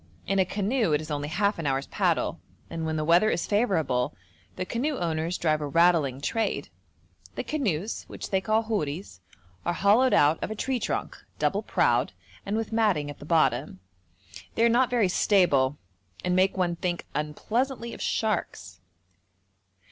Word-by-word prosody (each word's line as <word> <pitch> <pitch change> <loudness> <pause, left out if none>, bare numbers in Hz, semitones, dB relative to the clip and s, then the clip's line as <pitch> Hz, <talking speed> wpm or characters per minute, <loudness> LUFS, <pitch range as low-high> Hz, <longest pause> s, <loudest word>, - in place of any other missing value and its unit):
In 195 - 0
a 190 - +4
canoe 205 - 0
it 150 - +3
is 155 0 -7
only 145 0 -2
half 200 +4 0
an 160 - -2
hour's 135 0 0
paddle, - - 0 0.3
and 165 -1 -3
when 160 - -1
the 155 -1 -1
weather 175 +7 +5
is 175 - -1
favourable 160 - +1 0.4
the 185 - -3
canoe 265 +8 -2
owners 165 +1 -1
drive 155 -2 +1
a 145 - -2
rattling 165 -4 +3
trade. 225 +9 -1 0.7
The - - -3
canoes, 215 - -2
which - - -8
they 190 -1 +2
call 220 +3 +1
houris, 175 - -3 0.4
are 175 - 0
hollowed 225 +6 +4
out 150 +2 +3
of - - -2
a 215 - -4
tree 260 +3 -1
trunk, - - -3
double - - +1
prowed, - - +1 0.3
and 205 +2 0
with 225 0 -3
matting 195 -11 +1
at - - -13
the - - -10
bottom. 155 - +1 0.8
They 230 - +2
are - - +5
not 245 +2 +3
very 240 -5 +2
stable 150 -8 +3 0.5
and 180 0 +1
make 190 +1 +2
one 175 -2 0
think 175 0 -2
unpleasantly 235 - -2
of - - -9
sharks. 100 - -2
180 Hz, 170 wpm, -27 LUFS, 155-220 Hz, 0.8 s, weather